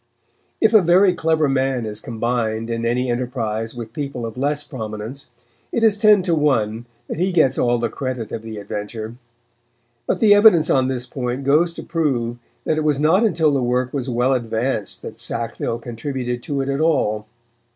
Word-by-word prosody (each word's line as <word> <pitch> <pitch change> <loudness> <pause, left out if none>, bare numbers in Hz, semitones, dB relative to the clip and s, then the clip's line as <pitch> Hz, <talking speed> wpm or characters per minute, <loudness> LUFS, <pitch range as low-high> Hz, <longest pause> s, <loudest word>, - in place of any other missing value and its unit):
If 220 0 +3
a 215 - +8
very 180 +2 +4
clever 160 -3 +1
man 135 -3 0
is 105 -1 -2
combined 115 -1 -2
in 115 0 -1
any 125 +2 0
enterprise 115 -2 -3
with 115 -2 -7
people 140 -4 -4
of 115 - -6
less 145 +3 -1
prominence, 110 0 -7 0.4
it 235 - 0
is 220 -2 +5
ten 210 -2 +5
to 175 -2 +1
one 120 -7 +1 0.2
that - - -5
he 185 +2 +1
gets 155 -7 +3
all 120 0 +2
the 115 0 0
credit 125 -2 -5
of 115 - -4
the 110 -1 -8
adventure. 105 +2 -6 0.9
But - - 0
the 210 -2 +6
evidence 205 -6 +6
on 130 -1 +3
this 130 -2 -2
point 125 +1 -4
goes 155 +5 +3
to - - -7
prove 120 -8 -1 0.2
that 155 - 0
it - - -1
was 150 -2 +1
not 165 +8 +4
until 165 -8 +2
the 135 - +1
work 125 +1 0
was 135 -2 -3
well 125 +2 +2
advanced 115 -5 -2
that 110 0 -8
Sackville 115 0 -2
contributed 120 +1 -4
to 140 +2 -2
it 135 - -3
at 140 +2 -1
all. 110 -10 +1
130 Hz, 185 wpm, -21 LUFS, 115-150 Hz, 0.9 s, a